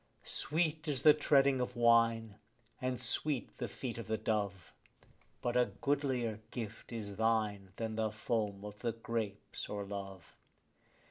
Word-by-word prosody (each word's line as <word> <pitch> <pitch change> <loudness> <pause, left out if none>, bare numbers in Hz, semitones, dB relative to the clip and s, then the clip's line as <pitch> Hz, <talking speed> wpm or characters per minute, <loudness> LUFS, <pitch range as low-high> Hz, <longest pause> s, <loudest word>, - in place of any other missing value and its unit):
Sweet 155 0 0
is 140 -4 0
the 150 - +10
treading 140 -3 +4
of 125 0 -2
wine, 115 -2 +4 0.4
and 130 -2 -1
sweet 130 +2 -1
the - - -2
feet 120 -3 -5
of 115 - -6
the 110 0 0
dove; 100 -4 -2 0.7
But 120 0 0
a 125 0 +5
goodlier 130 -6 0
gift 115 -2 -6
is 105 -4 -5
thine 110 -3 +1
than 110 0 -3
foam 105 -2 -2
of 105 0 -8
the 115 - -1
grapes 110 -3 -4
or 100 -1 -3
love. 95 -4 -7
115 Hz, 140 wpm, -35 LUFS, 105-125 Hz, 0.7 s, the